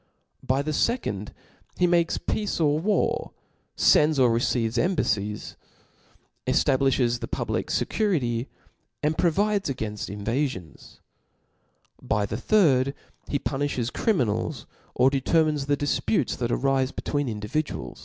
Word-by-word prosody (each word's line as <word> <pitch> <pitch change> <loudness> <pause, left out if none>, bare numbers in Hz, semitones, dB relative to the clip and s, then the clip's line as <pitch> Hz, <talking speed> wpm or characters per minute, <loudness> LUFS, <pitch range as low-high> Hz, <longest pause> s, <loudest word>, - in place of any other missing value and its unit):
By 135 +2 0
the 155 - -2
fecond, 145 - -1 0.5
he 180 - +3
makes 170 -1 +2
pcitce 210 -4 -2
or 150 -2 +2
war, 200 +2 0 0.4
fends 150 0 +4
or 125 -3 +4
re* 115 - +2
cebes 115 -1 0
embailicS) 110 - -1 0.9
efUbiiflies 130 -3 +2
the - - -5
pubHc - - -2
fecurity, 135 - 0 0.6
and 155 +1 +1
provide 200 +5 +1
againfl: 105 -6 -4
inra£ons. 115 - -4 1.0
By 105 0 0
the 105 +2 -4
thirds 140 - +3 0.3
he 140 - 0
pu« 135 - -3
niihes 130 -4 -1
oriminals, 125 - 0 0.3
or 130 +2 +4
deisermines 150 +1 +1
thedifputes 145 -6 0
that 120 -1 -2
arife 135 +1 +1
between 145 -2 -2
indmduak. 105 - -4
135 Hz, 115 wpm, -25 LUFS, 115-155 Hz, 1.0 s, fends